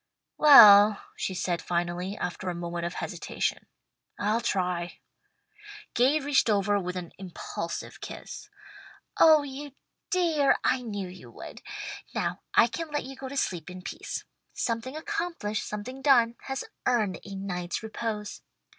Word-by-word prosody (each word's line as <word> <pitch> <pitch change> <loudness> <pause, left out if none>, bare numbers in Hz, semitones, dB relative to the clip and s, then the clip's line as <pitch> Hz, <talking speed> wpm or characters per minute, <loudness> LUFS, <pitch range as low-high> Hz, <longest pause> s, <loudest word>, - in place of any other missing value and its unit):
"Well," 210 -8 +9 0.2
she 190 - -3
said 175 -1 -1
finally, 175 +3 -2
after 180 +1 -4
a 175 - -3
moment 170 0 -3
of 175 - -7
hesitation, - - -3 0.5
"I'll 215 +3 +1
try." 180 -4 -1 1.0
Gay 265 +6 +3
reached 280 -4 +2
over 205 -1 +2
with 180 -1 -4
an 180 -2 -6
impulsive 185 -3 -6
kiss. - - -8 0.7
"Oh 315 -2 +7
you 285 0 -7 0.4
dear! 325 -6 +3
I 260 - +2
knew 205 -5 -4
you 180 -9 -12
would. 115 - -10 0.5
Now - - -1 0.2
I - - +7
can 310 +8 -5
let 295 0 -2
you 270 +1 -8
go 265 0 -7
to 280 - -6
sleep 175 - -2
in 180 0 -9
peace. - - -5 0.3
'Something 235 +3 -2
accomplished, 335 - -3
something 250 +6 -6
done, 240 -4 +4
has 270 0 -3 0.2
earned 215 -8 +1
a 200 -1 -8
night's 180 -1 -4
repose.' 215 -1 -4
210 Hz, 140 wpm, -28 LUFS, 180-270 Hz, 1.0 s, Well